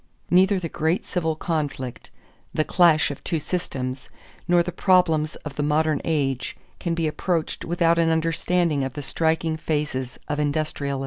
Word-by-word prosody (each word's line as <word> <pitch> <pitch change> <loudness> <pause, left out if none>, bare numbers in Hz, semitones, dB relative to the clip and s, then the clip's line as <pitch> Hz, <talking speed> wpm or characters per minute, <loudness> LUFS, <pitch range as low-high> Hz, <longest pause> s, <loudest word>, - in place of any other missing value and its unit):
Neither 190 +2 +5
the 170 - -3
great 160 +3 -1
civil 160 -4 -1
conflict 145 -6 -3 0.5
the 155 - +3
clash 165 -3 +4
of 140 - -9
two 165 -3 -1
systems 135 -6 -4 0.4
nor 175 0 +4
the 180 - -4
problems 165 -4 +3
of 145 -2 -7
the - - 0
modern 150 0 +1
age 135 -5 -1 0.2
can 170 -2 -1
be 165 -1 0
approached 165 +1 -2
without 170 0 +2
an 165 -1 +3
understanding 165 -1 +1
of 135 -1 -3
the 145 - -6
striking 160 +2 0
phases 145 -5 -2
of 150 0 -2
industrialism. 145 -2 -1
160 Hz, 155 wpm, -24 LUFS, 145-170 Hz, 0.5 s, Neither